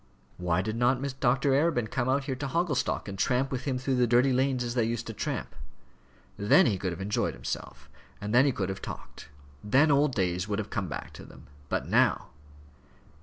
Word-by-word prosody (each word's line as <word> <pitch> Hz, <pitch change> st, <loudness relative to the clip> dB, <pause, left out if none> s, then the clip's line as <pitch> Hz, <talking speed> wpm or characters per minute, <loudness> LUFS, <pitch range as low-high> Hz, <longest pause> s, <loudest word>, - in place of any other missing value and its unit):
Why 90 Hz, +1 st, 0 dB
did 110 Hz, +2 st, -3 dB
not 125 Hz, +2 st, +2 dB, 0.2 s
Dr. 135 Hz, +2 st, +2 dB
Arabin 135 Hz, -6 st, +1 dB
come 130 Hz, -1 st, -1 dB
out 135 Hz, +1 st, +1 dB
there 135 Hz, -, -2 dB
to 140 Hz, +2 st, -4 dB
Hogglestock, 165 Hz, -5 st, -1 dB
and 100 Hz, -1 st, -7 dB
tramp 130 Hz, +5 st, +1 dB
with 130 Hz, -2 st, -4 dB
him 135 Hz, -3 st, -1 dB
through 130 Hz, 0 st, -1 dB
the 125 Hz, -1 st, +3 dB
dirty 125 Hz, +3 st, +4 dB
lanes 130 Hz, -1 st, +1 dB
as 120 Hz, -1 st, -3 dB
they 120 Hz, -2 st, +1 dB
used 115 Hz, +1 st, -2 dB
to 115 Hz, -, -6 dB
tramp? -, -, -4 dB, 0.8 s
Then 105 Hz, -, +5 dB
he 100 Hz, -8 st, +1 dB
could 90 Hz, -1 st, -2 dB
have 85 Hz, -, -6 dB
enjoyed 100 Hz, -8 st, -1 dB
himself; -, -, -6 dB, 0.3 s
then 120 Hz, +6 st, +3 dB
he 140 Hz, -, +3 dB
could 95 Hz, -6 st, -3 dB
have 95 Hz, -, -5 dB
talked; -, -, -9 dB, 0.3 s
then 135 Hz, +9 st, +4 dB
old 140 Hz, -1 st, +3 dB
days 90 Hz, -2 st, 0 dB
would 105 Hz, -1 st, -1 dB
have 105 Hz, -1 st, -4 dB
come 100 Hz, -4 st, -2 dB
back 75 Hz, -, -6 dB
to -, -, -10 dB
them. -, -, -14 dB, 0.2 s
But -, -, -2 dB
now! -, -, +2 dB
120 Hz, 205 wpm, -28 LUFS, 105-135 Hz, 0.8 s, Then